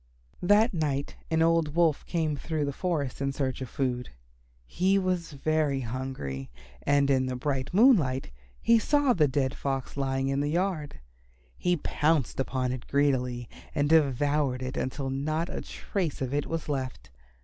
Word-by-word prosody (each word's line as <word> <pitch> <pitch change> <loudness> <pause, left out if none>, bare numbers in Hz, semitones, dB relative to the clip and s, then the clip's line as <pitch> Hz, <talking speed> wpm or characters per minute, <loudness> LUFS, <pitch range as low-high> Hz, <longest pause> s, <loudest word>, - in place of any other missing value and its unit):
That 205 +5 +4
night 145 -4 -1
an 160 0 +3
old 165 -2 +2
Wolf 165 -4 +3
came 160 -3 0
through 155 +1 -2
the 140 - -2
forest 145 -7 -2
in 140 0 0
search 135 -2 -2
of 130 - -5
food. 125 -3 -2 0.6
He 185 - +2
was 185 -4 -1
very 145 -1 0
hungry, 115 - -5 0.3
and 140 0 +3
in 130 -1 +2
the 130 - -2
bright 130 0 -2
moonlight 175 - +4 0.3
he 230 0 +4
saw 290 +2 +3
the 155 -7 +3
dead 130 0 0
Fox 135 -2 -3
lying 135 -1 0
in 135 0 0
the 145 +1 0
yard. 170 -3 -1 0.6
He 180 0 +1
pounced 150 -3 0
upon 130 -1 -1
it 125 -2 -6
greedily 125 -4 +1 0.3
and 145 -1 +1
devoured 145 -3 +2
it 130 +1 -4
until 135 +1 -2
not 155 +5 -1
a - - -4
trace 180 -7 -3
of 130 0 -3
it 145 0 0
was 165 -1 -3
left. 130 - -4
145 Hz, 160 wpm, -28 LUFS, 130-165 Hz, 0.6 s, That